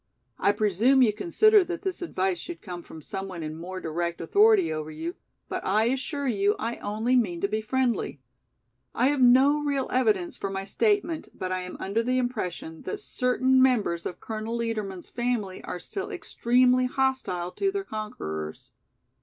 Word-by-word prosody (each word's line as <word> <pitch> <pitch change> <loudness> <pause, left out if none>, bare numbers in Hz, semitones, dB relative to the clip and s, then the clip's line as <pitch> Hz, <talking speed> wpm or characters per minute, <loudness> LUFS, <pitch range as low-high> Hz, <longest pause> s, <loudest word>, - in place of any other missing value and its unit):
I - - +4
presume 215 +6 +3
you 215 -4 +3
consider 415 - +4
that 350 +2 -5
this 380 -2 -3
advice 190 - -1
should 345 -1 -8
come 180 -3 -6
from 160 -2 -12
some 195 +5 -4
one 175 -4 -6
in 155 0 -5
more 185 +3 -6
direct 170 +1 -3
authority 200 -1 +4
over 155 0 -4
you, 160 +3 -5 0.3
but - - -4
I 210 +3 +2
assure 270 +4 -1
you 205 -3 +2
I 235 +1 -3
only 220 +5 0
mean 195 -9 +1
to 200 - +2
be 215 +2 -1
friendly. 240 - -1 0.8
I 250 +3 +3
have 285 -2 0
no 260 +4 +6
real 280 -2 0
evidence 215 -8 +1
for 195 - -3
my 195 0 -4
statement, 370 - 0
but 185 0 -4
I 185 - 0
am 180 0 -7
under 200 +4 0
the 255 +2 0
impression 185 -10 -3
that 420 - -5
certain 260 -6 +2
members 215 -10 +2
of - - -7
Colonel 220 +1 -4
Liedermann's 215 -6 -3
family 240 -6 -2
are - - -4
still 390 - -5
extremely 250 +1 +2
hostile 255 -10 -1
to 395 - 0
their 395 0 -2
conquerors. 80 - -6
220 Hz, 175 wpm, -27 LUFS, 185-260 Hz, 0.8 s, no